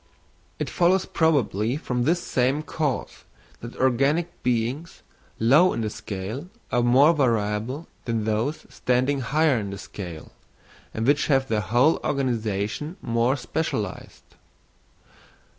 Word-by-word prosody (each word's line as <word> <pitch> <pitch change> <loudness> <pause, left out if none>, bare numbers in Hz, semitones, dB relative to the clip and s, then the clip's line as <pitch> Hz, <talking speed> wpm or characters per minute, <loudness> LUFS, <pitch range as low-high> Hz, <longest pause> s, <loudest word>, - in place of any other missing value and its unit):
It - - -3
follows 180 +1 +2
probably 130 - +1
from 125 -5 -2
this 175 +4 +1
same 130 +4 0
cause, 150 -4 -3 0.4
that 120 +1 -9
organic 140 +7 +1
beings 125 +6 -2 0.4
low 145 +11 +5
in - - -2
the 110 -1 -2
scale 110 - -6 0.2
are 120 - +2
more 130 +7 +5
variable 120 +1 0 0.2
than 115 -2 -1
those 110 +8 -1
standing 130 +3 0
higher 145 0 +2
in 100 -2 -4
the 100 - -6
scale, 90 -5 -8 0.6
and 110 - -3
which 145 +3 +3
have 135 -2 +2
their 110 -1 +1
whole 125 +9 +3
organisation 120 - -2
more 120 +3 +1
specialised. 110 -11 -4
125 Hz, 125 wpm, -24 LUFS, 110-150 Hz, 0.6 s, low